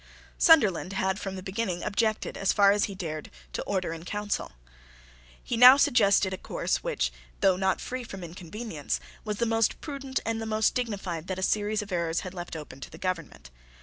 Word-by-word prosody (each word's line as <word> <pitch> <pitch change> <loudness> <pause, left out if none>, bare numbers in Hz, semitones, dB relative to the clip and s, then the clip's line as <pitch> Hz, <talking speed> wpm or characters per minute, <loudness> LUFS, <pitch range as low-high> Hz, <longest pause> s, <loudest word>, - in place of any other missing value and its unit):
Sunderland 210 - +5
had 190 0 0
from 195 -2 -5
the 185 - -7
beginning 190 -3 -2
objected, 215 +1 0
as 195 - +1
far 200 -1 +5
as 205 0 +2
he 200 - -7
dared, 155 -5 -5 0.3
to - - -2
the - - -7
Order 185 -4 -1
in 165 0 -8
Council. 205 - -3 0.9
He - - -2
now 250 +3 +10
suggested 200 -7 +4
a 185 - -5
course - - -1
which, - - -1 0.3
though 190 -1 +5
not 190 0 +1
free 255 0 -5
from 195 -5 -8
inconveniences, 175 - -5 0.2
was 210 -2 -3
the 235 - +1
most 225 -1 +1
prudent 275 -3 -4
and 225 0 -1
the 225 - -4
most 215 0 +2
dignified 195 -9 -3
that 185 - -3
a 190 - -3
series 210 +2 +1
of 205 - -12
errors 170 -2 0
had 185 - -7
left 175 -2 -6
open 150 -4 -8
to - - -8
the 160 - -12
government. 165 - -4
195 Hz, 200 wpm, -28 LUFS, 180-220 Hz, 0.9 s, now